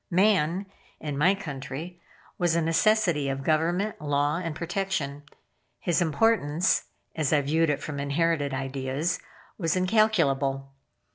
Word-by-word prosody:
Man, 185 -1 +2 0.3
in 150 -2 -4
my 175 +8 +4
country, 160 0 -7 0.4
was 175 -2 +2
a 170 - +2
necessity 165 -3 +2
of 135 0 -3
government, 170 +6 0
law, 145 +1 +1
and 165 -3 -4
protection. 170 -5 -2 0.6
His 175 -1 +1
importance, 170 -1 +2 0.3
(as 155 -4 0
I 150 -2 +4
viewed 160 +3 +1
it 145 -1 -1
from 145 -2 -5
inherited 145 +1 0
ideas) 135 +4 -2 0.4
was 165 -3 +1
incalculable. 165 -10 +2
160 Hz, 125 wpm, -27 LUFS, 140-180 Hz, 0.6 s, my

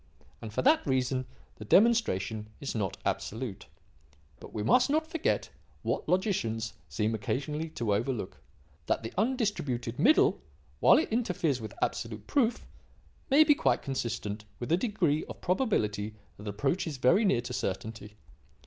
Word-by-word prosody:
And, 110 - -7
for - - -1
that 305 +4 +5
reason, 130 -1 0 0.3
the - - -8
demonstration 110 - +3
is 140 - -4
not 100 -5 -2
absolute. 110 -2 -3 0.7
But - - -11
we 105 - -3
must 250 - +4
not 310 +2 +2
forget, 320 0 -1 0.3
what - - -2
logicians 115 - 0 0.2
seem 105 +10 0
occasionally 150 +9 -2
to 115 -9 -1
overlook: 110 -1 -2 0.5
that - - 0
the 115 - -6
'undistributed 190 - -1
middle,' 350 - +4 0.4
while - - +7
it 320 - +1
interferes 175 - 0
with 110 -2 -7
absolute 110 -2 -3
proof, 245 - +1 0.6
may 285 +3 +7
be 305 - +6
quite 290 - +1
consistent 115 -6 -3 0.2
with 120 - -4
a - - +6
degree 185 -8 +1
of - - -9
probability 110 - 0 0.2
that 105 - -10
approaches 140 - -1
very 150 - +4
near 190 - +3
to 120 - -6
certainty. 105 +2 -4
130 Hz, 145 wpm, -30 LUFS, -, 0.7 s, while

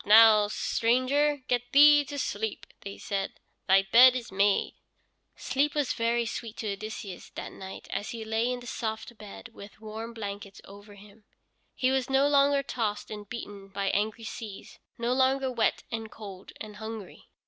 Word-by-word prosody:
"Up - - -19
now, 215 -1 +8
stranger, 255 +7 +1
get 245 0 -1
thee 295 +1 +8
to 285 +1 -6
sleep," 220 -5 -3 0.3
said 195 -2 -2
they. - - -29 0.5
"Thy - - -21
bed 255 +2 +8
is 245 -2 -5
made." 200 +1 +2 0.6
Sleep 285 +3 0
was 290 -3 +1
very 235 +1 0
sweet 225 0 -6
to 215 -2 -3
Odysseus 205 -2 -7
that - - -6
night 190 0 -9
as 205 - -3
he 230 -2 -6
lay 225 +3 0
in 250 0 -4
the - - -11
soft 225 0 -4
bed 215 +3 -10
with 200 -1 -12
warm 220 +2 -7
blankets 200 -2 -7
over 205 +1 -13
him. 205 +1 -17 0.5
He 255 0 +1
was 265 -1 0
no 270 +1 +4
longer 280 -1 +4
tossed 220 -6 -3
and 210 -1 -8
beaten 205 -4 -8
by 195 0 -2
angry 215 +3 -1
seas, 220 -3 -8 0.2
no 235 +1 0
longer 265 0 +2
wet 230 -3 0
and 225 -1 -4
cold 195 -4 -10
and 210 -1 -8
hungry. 220 -3 -8
225 Hz, 170 wpm, -28 LUFS, 205-255 Hz, 0.6 s, now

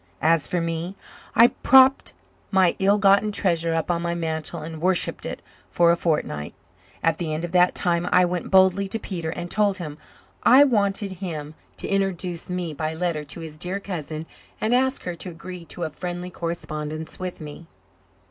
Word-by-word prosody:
As 160 -2 +3
for 180 - -1
me, 165 +2 -3 0.4
I 235 +1 +8
propped 265 +1 +6 0.4
my 190 -3 +3
ill 200 +2 +4
gotten 200 +1 +4
treasure 170 -5 0
up 165 +2 0
on 170 -1 -1
my 170 0 -1
mantel 160 -1 -3
and 160 0 -7
worshipped 185 0 0
it - - -6 0.3
for 170 -1 +4
a - - +4
fortnight. 150 - -2 0.5
At 165 -1 +2
the 165 -3 -2
end 155 +2 -2
of 170 - -7
that 180 0 +4
time 175 0 0
I 180 - +5
went 175 0 -3
boldly 190 +1 +4
to 225 - -2
Peter 170 -7 -4
and 175 +1 -5
told 205 -3 +2
him 155 -4 -7 0.4
I 260 +4 +7
wanted 205 -6 +1
him 155 -5 -5 0.2
to - - -5
introduce 185 -3 -2
me 180 -3 -3
by 155 +2 -3
letter 165 -3 -1
to 160 +3 -7
his 155 -1 -9
dear 185 +4 -2
cousin 160 -5 -5 0.3
and 220 +2 +1
ask 260 +2 +1
her 180 - -3
to 170 +2 -6
agree 175 +1 -9
to 175 - -6
a 160 - -3
friendly 180 +2 -5
correspondence 155 -2 -5
with 185 -1 -5
me. 155 +1 -9
175 Hz, 185 wpm, -24 LUFS, 160-190 Hz, 0.5 s, I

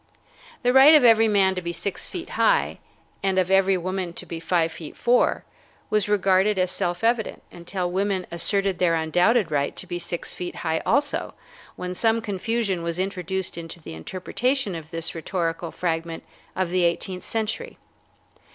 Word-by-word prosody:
The 245 0 +3
right 275 +4 +9
of 300 - +6
every 225 -1 +6
man 195 -3 +3
to 185 - -4
be 170 -1 -3
six 185 +3 -4
feet 350 -2 -7
high, - - +2 0.4
and 190 -1 0
of 185 0 +2
every 195 0 +4
woman 185 0 -3
to - - -8
be 165 - -6
five 165 -1 +1
feet 160 -2 -9
four, 245 +1 +2 0.5
was 210 -1 +2
regarded 195 0 +3
as 185 -1 +1
self 175 0 -1
evident 230 -1 0
until 175 +1 -4
women 190 0 0
asserted 195 +2 0
their 170 -2 +3
undoubted 175 +5 +2
right 140 -1 0
to - - -6
be 175 - -4
six 170 0 -4
feet 180 -1 -6
high 160 0 0
also, 285 0 0 0.4
when 180 0 -5
some 225 +4 +2
confusion 210 -2 -2
was 170 0 -2
introduced 190 -1 -2
into 165 +1 -7
the 155 - -9
interpretation 195 - -2
of 160 -2 -7
this 165 -1 -1
rhetorical 165 0 -3
fragment 165 -1 -3 0.3
of 185 -2 -1
the 180 0 +2
eighteenth 180 +2 -1
century. 225 -1 -3
185 Hz, 170 wpm, -24 LUFS, 170-210 Hz, 0.5 s, right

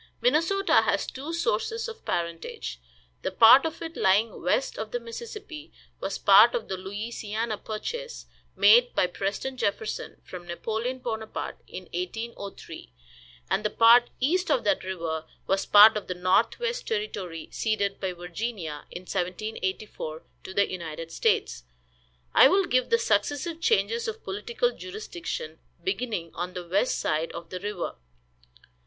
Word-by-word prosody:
Minnesota 330 +10 +3
has - - +1
two 280 +5 -6
sources 455 +5 -1
of 455 -1 -9
parentage. 170 - -3 0.4
The - - -1
part 230 +10 +7
of 325 +1 -7
it 325 0 -6
lying 205 +4 +2
west - - 0
of - - -4
the 485 - -2
Mississippi 425 -10 -8 0.3
was 195 0 -3
part 210 +4 +7
of 225 - -3
the 190 - -1
Louisiana 215 +3 -4
purchase, 480 - -5 0.3
made 235 +5 +6
by - - +4
President 200 +8 -3
Jefferson 215 +2 -2
from 175 -1 -9
Napoleon 225 +8 -3
Bonaparte 220 -3 -5
in - - -8
1803, 230 - -6 0.6
and 215 - +1
the 210 - +1
part 235 +3 +6
east 355 +8 +1
of - - +2
that 300 - +1
river 165 -4 -3 0.2
was 195 0 0
part 210 +2 +9
of 210 - -4
the 180 - -3
Northwest 230 - +1
Territory, 200 - -3
ceded 205 -3 -1
by 190 -2 -2
Virginia, 175 -2 -5
in 175 - -7
1784, 185 -3 -4 0.2
to - - -8
the 200 - +4
United 165 -2 -6
States. - - 0 0.7
I - - +9
will 390 0 +3
give 255 -3 +1
the 465 - +5
successive 335 - 0
changes 460 +2 +1
of 450 0 -5
political 475 +4 -1
jurisdiction, 425 +3 -6 0.2
beginning 230 - -2
on 180 +1 -4
the 180 -1 -6
west 200 +8 +1
side 155 +2 -1
of 170 -1 -8
the 185 - -4
river. 205 -2 -4
220 Hz, 145 wpm, -27 LUFS, -, 0.7 s, part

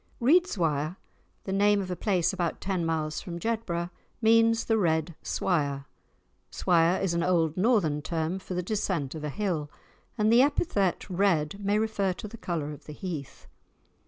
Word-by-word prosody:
Reidswire, 185 - +2 0.5
the 190 - -3
name 205 +1 +4
of 185 -2 -4
a - - -1
place 185 -2 +1
about 175 -3 -2
ten 190 -3 -1
miles 155 -2 -1
from 170 -2 -6
Jedburgh, 175 -4 -2 0.3
means 230 0 +4
the 225 -1 +2
Red 160 -2 +1
Swire. 140 -6 -1 0.6
Swire 175 +1 +2
is 190 -3 0
an 170 - 0
old 165 -3 +2
northern 185 -8 +2
term 165 +3 -2
for 185 -1 -6
the 180 - -1
descent 185 -8 -2
of 155 -2 -7
a 150 - -2
hill, 165 -4 -2 0.5
and 215 +1 +3
the 240 - +7
epithet 260 - +1
red 185 -3 +1
may 200 +1 +2
refer 215 -3 0
to 195 - -8
the 220 - -10
colour 160 -7 -3
of 145 - -11
the 150 - -8
heath. 155 -5 -6
180 Hz, 165 wpm, -28 LUFS, 160-205 Hz, 0.6 s, the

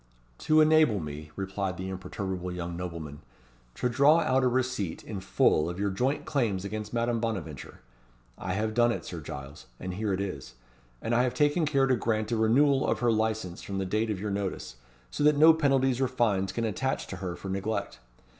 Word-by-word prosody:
"To 155 0 +4
enable 155 -8 +5
me," 75 -1 -7
replied 95 -2 -3
the 95 +1 -5
imperturbable 95 -1 -4
young 85 -1 -5
nobleman, 85 -5 -6 0.5
"to - - 0
draw 140 +7 +5
out 130 -3 +2
a - - +4
receipt 125 -8 -1
in 105 -3 -6
full 85 -3 +2
of 90 +2 -6
your 100 0 0
joint 130 +9 -1
claims 110 -9 0
against 105 +1 -5
Madame 120 0 0
Bonaventure. 95 - -5 0.5
I 90 - -4
have 110 +3 -1
done 120 +1 +4
it, - - -4
Sir - - -6
Giles; 70 +1 -9
and 90 0 -5
here 105 +2 -2
it 95 - 0
is. 90 -12 -5 0.5
And 115 - -1
I 120 - +4
have 125 -1 0
taken 150 +2 +2
care 140 -3 +3
to 130 -1 +3
grant 110 -1 -1
a - - +2
renewal 135 +5 +3
of - - +1
her 120 -1 +3
licence 110 -5 -1
from 100 - -5
the 95 - -1
date 110 +4 0
of 105 -3 -2
your 105 +1 -3
notice; 100 -9 -4 0.3
so - - -2
that 150 0 +5
no 160 +2 +8
penalties 135 -4 +2
or 130 - +3
fines 105 -7 0
can 115 +4 -2
attach 130 +5 -1
to 100 - -7
her 90 -1 -4
for 95 - -8
neglect. 100 +3 -3
110 Hz, 200 wpm, -28 LUFS, 95-130 Hz, 0.5 s, no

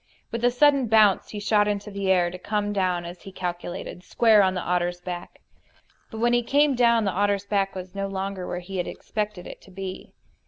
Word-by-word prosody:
With 230 +1 -4
a 245 - +5
sudden 275 0 +3
bounce 215 -3 +4
he 210 - -6
shot 205 0 +2
into 205 0 -3
the 200 -1 -2
air, 175 -2 +3
to 180 - -8
come 205 +1 -2
down, 180 -3 0
as 175 +1 -9
he 195 - -10
calculated, 175 -1 -5
square 220 0 +4
on 190 -1 +2
the 180 - -2
otter's 175 0 -1
back. 175 -1 -7 0.7
But 220 - -8
when 240 +2 +2
he 240 - +4
came 285 +4 +3
down 235 -3 +3
the 195 - +1
otter's 200 +1 0
back 195 -1 0
was 185 -1 -7
no 195 0 -3
longer 195 -1 -4
where 180 - -4
he 190 +2 -7
had 175 - -2
expected 210 -4 -4
it - - -10
to - - -17
be. 190 0 -8
195 Hz, 220 wpm, -25 LUFS, 180-215 Hz, 0.7 s, a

